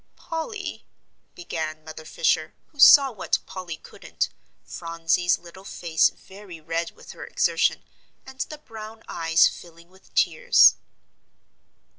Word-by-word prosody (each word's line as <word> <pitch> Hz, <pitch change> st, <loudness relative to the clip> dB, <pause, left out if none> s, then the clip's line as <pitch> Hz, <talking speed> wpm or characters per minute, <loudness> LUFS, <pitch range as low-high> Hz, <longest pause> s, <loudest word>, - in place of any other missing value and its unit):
"Polly," 390 Hz, +5 st, -6 dB, 0.5 s
began 155 Hz, -2 st, -5 dB
Mother 155 Hz, 0 st, -10 dB
Fisher, 155 Hz, 0 st, 0 dB
who 290 Hz, -, -25 dB
saw 275 Hz, 0 st, +8 dB
what 210 Hz, -5 st, -1 dB
Polly 180 Hz, -3 st, -7 dB
couldn't, -, -, -5 dB, 0.3 s
Phronsie's 165 Hz, +1 st, -1 dB
little 175 Hz, +2 st, -14 dB
face 170 Hz, -4 st, +1 dB
very 190 Hz, -3 st, -13 dB
red 165 Hz, +1 st, -3 dB
with -, -, -13 dB
her -, -, -10 dB
exertion, -, -, 0 dB, 0.4 s
and 265 Hz, 0 st, -13 dB
the 305 Hz, -, -4 dB
brown 225 Hz, -5 st, -11 dB
eyes 165 Hz, 0 st, +3 dB
filling 170 Hz, 0 st, -11 dB
with 190 Hz, +1 st, -23 dB
tears. -, -, +5 dB
175 Hz, 120 wpm, -24 LUFS, 165-225 Hz, 0.5 s, saw